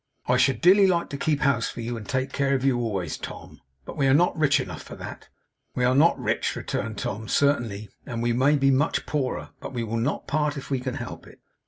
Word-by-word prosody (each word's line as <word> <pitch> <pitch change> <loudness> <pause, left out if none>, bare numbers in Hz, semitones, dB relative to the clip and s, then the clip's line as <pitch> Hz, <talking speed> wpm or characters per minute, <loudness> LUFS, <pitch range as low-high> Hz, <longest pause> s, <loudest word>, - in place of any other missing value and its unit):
'I - - +3
should 135 - +2
dearly 195 +3 +6
like 170 -2 +1
to - - -3
keep 150 0 0
house 140 -6 +2
for 120 - -7
you 120 +1 -3
and 110 +1 -8
take 130 -1 -1
care 140 0 +1
of 135 0 -1
you 130 -3 +3
always, 100 -9 -2
Tom; - - -9 0.2
but - - -8
we 140 - +2
are 135 - +5
not 175 +4 +3
rich 155 -3 +3
enough 90 -5 -5
for - - -10
that.' - - -9 0.5
'We 125 - +1
are 125 - +3
not 155 +6 +4
rich,' - - -1
returned 110 0 -4
Tom, 110 +2 -4
'certainly; 115 -7 +1 0.2
and 115 -1 -4
we 120 0 +1
may 135 +5 +3
be 135 -1 +3
much 145 +4 +1
poorer. 135 -4 -2
But - - -8
we 120 -2 -2
will 115 0 -2
not 120 +5 -1
part 150 0 0
if 140 - -8
we 135 - +1
can 130 0 -4
help - - -7
it. - - -16
130 Hz, 240 wpm, -25 LUFS, 115-145 Hz, 0.5 s, dearly